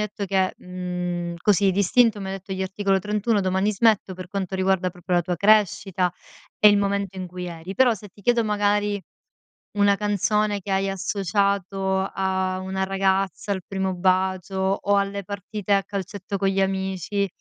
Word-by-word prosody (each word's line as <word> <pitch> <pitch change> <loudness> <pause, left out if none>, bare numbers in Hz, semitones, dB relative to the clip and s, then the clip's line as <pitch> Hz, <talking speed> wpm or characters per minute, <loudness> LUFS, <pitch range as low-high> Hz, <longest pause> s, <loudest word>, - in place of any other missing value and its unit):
detto 205 0 -5
che 190 -1 +1
mhmm, 180 -1 -4
così 200 0 +3
d'istinto, 210 +4 +3
mi 195 - -5
hai 190 - -4
detto 195 0 -7
gli 190 0 -2
Articolo 195 +1 0
31 210 +2 0
“Domani 190 +2 +1
smetto“,per 195 -4 +1
quanto 190 0 -3
riguarda 190 -1 +1
proprio 180 0 -4
la 175 - +4
tua 175 +1 -2
crescita, 195 -2 +3 0.5
e - - +6
il 205 -1 +4
momento 200 -1 -1
in 185 -1 -5
cui 180 0 -6
eri. 175 +2 -7
Però, 250 -1 +5
se 210 0 -11
ti 205 +2 -20
chiedo, 240 +2 +3
magari, 205 -1 +1 0.8
una 205 0 +4
canzone 210 0 0
che 195 - -7
hai 195 0 +1
associato 195 -1 0
a 190 -1 -1
una 190 0 -2
ragazza, 195 0 0
al 190 -2 -3
primo 190 -1 -2
bacio, 185 +1 0 0.2
o 205 0 +2
alle 200 0 -1
partite 200 +1 -4
a 195 0 +4
calcetto 200 0 -5
con 195 0 +1
gli 195 0 +1
amici, 190 +1 -1
195 Hz, 170 wpm, -24 LUFS, 185-205 Hz, 0.8 s, e